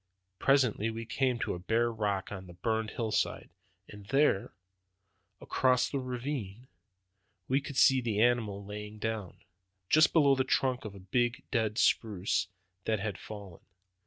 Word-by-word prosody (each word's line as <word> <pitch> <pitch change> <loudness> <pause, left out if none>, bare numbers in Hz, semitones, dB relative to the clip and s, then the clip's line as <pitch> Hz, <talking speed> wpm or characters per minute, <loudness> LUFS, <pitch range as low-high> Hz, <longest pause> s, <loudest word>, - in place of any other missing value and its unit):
Presently 125 -6 +3
we 115 +1 -5
came 130 +2 0
out 120 - -3
on - - -1
a 90 - -5
bare 115 +5 +1
rock 105 -4 -2
on 95 -2 -7
the 90 - -11
burned 110 +3 -1
hillside, 110 -2 -2 0.4
and 100 -1 -12
there, 135 -6 +2 0.9
across 130 0 +1
a 140 - 0
ravine, 125 -3 -5 0.8
we 135 +2 +2
could 140 -1 -7
see 135 -1 +6
the 110 -4 -1
animal 110 -4 +1
lying 105 +1 -7
down, 110 -4 -4 0.5
just 155 +1 +6
below 145 -4 +5
the 130 -1 +2
trunk 130 -2 0
of 100 -2 -7
a - - -10
big 120 +6 0
dead 110 -4 0
spruce 100 -4 +1 0.4
that 110 -2 +1
had 100 -2 -4
fallen. 100 -5 -10
110 Hz, 155 wpm, -31 LUFS, 105-130 Hz, 0.9 s, see